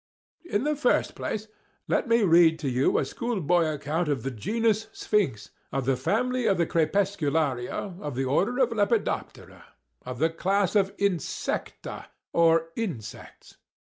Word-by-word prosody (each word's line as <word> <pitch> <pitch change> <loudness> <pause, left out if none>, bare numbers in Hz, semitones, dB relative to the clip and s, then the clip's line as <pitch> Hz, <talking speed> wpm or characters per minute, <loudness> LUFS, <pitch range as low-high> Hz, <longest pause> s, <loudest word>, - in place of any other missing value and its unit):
In 225 -9 -1
the 300 +1 +1
first 295 - +1
place, 215 0 -4 0.4
let - - +1
me 230 -1 +4
read 165 -3 +5
to 150 -4 -2
you 125 +2 +2
a - - +1
schoolboy 180 - 0
account 155 +3 -2
of 135 -6 -1
the 135 - -2
genus 220 - 0
Sphinx, 130 - -1 0.2
of 135 -2 -2
the 135 0 +2
family 245 - 0
Crepuscularia 165 - 0
of 145 -4 -5
the 135 +1 -1
order 155 - +2
Lepidoptera, 230 -4 -1 0.4
of 125 0 -6
the 160 +4 +2
class 195 +3 0
of 195 -1 +3
Insecta—or 165 -2 -1
insects. 160 - -7
175 Hz, 130 wpm, -26 LUFS, 145-210 Hz, 0.4 s, read